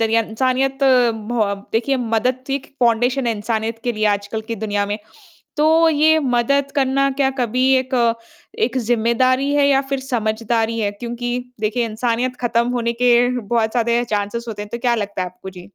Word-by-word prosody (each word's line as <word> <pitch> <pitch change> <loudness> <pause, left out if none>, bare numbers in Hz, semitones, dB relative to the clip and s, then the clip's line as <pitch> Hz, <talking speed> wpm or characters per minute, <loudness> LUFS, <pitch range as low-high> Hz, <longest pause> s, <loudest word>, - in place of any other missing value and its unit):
है, 225 0 +2
इंसानियत 260 +4 0
बहो 235 -5 +2 0.2
देखिए 235 +5 +1 0.2
मदद 255 +4 -1
एक 270 - -17
फाउंडेशन 245 +2 +2
है 235 - +2
इंसानियत 220 +1 -2
के 240 - 0
लिए 215 0 -2
आजकल 205 +1 -1
की - - 0
दुनिया 205 -1 -1
में, 205 +1 -3 0.6
तो 320 +2 +4
ये 315 +1 +4 0.2
मदद 280 +4 +1
करना 275 0 +2
क्या 270 -1 +3
कभी 250 +2 +1
एक 260 +1 -3 0.7
एक 255 +2 -3
ज़िम्मेदारी 245 +4 +1
है 290 -1 +4
या 270 -1 +4
फिर 275 - -1
समझदारी 230 -2 -1
है 205 -2 0
क्योंकि 240 +1 -3 0.3
देखिए, 220 +3 0
इंसानियत 240 +3 -1
खत्म 235 0 +1
होने 235 0 0
के 245 -1 +5 0.3
बहुत 220 0 0
सारे 235 0 +2
चांसेज़ 205 +3 -2
होते 205 -2 -5
हैं, 210 - -9
तो 235 - -3
क्या 240 0 +1
लगता 205 -4 -3
है - - -3
आपको 185 +1 -11
जी? 185 -1 -12
235 Hz, 175 wpm, -19 LUFS, 220-260 Hz, 0.7 s, के